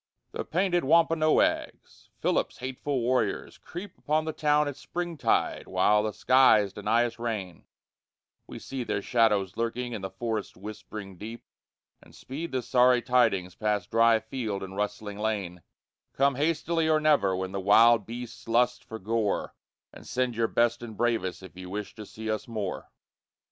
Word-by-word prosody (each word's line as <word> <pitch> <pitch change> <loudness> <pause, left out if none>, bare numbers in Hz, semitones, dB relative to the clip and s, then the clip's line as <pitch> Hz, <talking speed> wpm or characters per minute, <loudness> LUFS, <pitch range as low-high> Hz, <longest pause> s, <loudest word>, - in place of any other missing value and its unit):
The - - -4
painted 175 0 0
Wampanoags, 160 +1 +1
Philip's - - 0
hateful 130 +1 -3
warriors, 120 -3 -1
creep 180 +2 -9
Upon 155 +1 0
the 160 - -3
town 150 0 +2
at 145 - -4
springtide 175 +2 -1
while 105 +3 +3
the 110 0 -2
skies 110 -6 +4
deny 110 +4 +1
us 120 0 -6
rain; 105 -7 -4 0.8
We - - -8
see 135 -2 -5
their 100 -3 -2
shadows 105 -5 +2
lurking 120 +1 -2
in 105 - -4
the 95 - -4
forest's 110 -2 -4
whispering 100 -1 -8
deep, 115 +3 -8 0.6
And - - -18
speed 155 +6 -6
the 130 -1 -2
sorry 125 0 +4
tidings 95 -8 +2
past 105 -3 -2
dry 115 0 +5
field 110 -3 -4
and 95 0 -8
rustling 105 0 -4
lane: 100 -5 -2 0.6
_Come 140 0 +3
hastily 160 +2 0
or 155 -1 +4
never 145 -12 +3
when 95 0 -3
the 100 - -3
wild 110 +2 +5
beast 120 0 -8
lusts 125 +2 +2
for 110 - -8
gore, 110 0 -1 0.4
And - - -13
send 125 -1 -1
your 115 0 +1
best 120 +1 +1
and 115 -3 -8
bravest 115 -6 -1
if 95 - -12
you 90 0 -9
wish 105 +2 -5
to 105 -2 -10
see 110 0 -8
us 110 - -3
more! 105 -5 -4
115 Hz, 160 wpm, -27 LUFS, 105-130 Hz, 0.8 s, dry